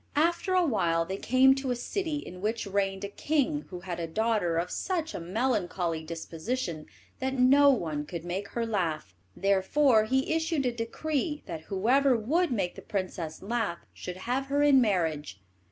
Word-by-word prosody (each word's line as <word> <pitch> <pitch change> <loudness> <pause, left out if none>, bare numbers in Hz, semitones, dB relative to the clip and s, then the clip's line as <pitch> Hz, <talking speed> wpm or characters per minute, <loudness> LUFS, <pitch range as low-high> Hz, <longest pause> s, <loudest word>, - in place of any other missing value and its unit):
After 340 +5 +2
awhile 175 - +2
they 190 +3 -4
came 260 +4 +5
to 270 -1 -3
a 250 - +1
city 320 +6 -3
in 180 -11 -7
which 220 +2 -1
reigned 195 -1 -1
a - - -1
king 295 +6 0
who 180 -1 -7
had 175 -2 -5
a 165 - -2
daughter 210 -2 0
of 175 +2 -1
such 335 -4 -2
a - - -4
melancholy 180 -4 -1
disposition 165 +2 -4 0.3
that 265 0 -2
no 275 +3 +6
one 155 - 0
could 170 -1 -6
make 190 +3 -3
her 235 +2 -2
laugh; 170 - -2 0.2
therefore 215 +5 +3
he 265 +6 +1
issued 320 -3 0
a 250 - +2
decree 295 +6 -2
that 160 -3 -7
whoever 250 +7 +3
would 310 +10 +1
make 195 -7 -1
the - - -10
princess 180 -5 -4
laugh 215 -4 -2
should 180 0 -7
have 260 +3 -1
her 285 +1 +2
in 280 -3 +6
marriage. 160 - 0
220 Hz, 170 wpm, -28 LUFS, 175-270 Hz, 0.3 s, no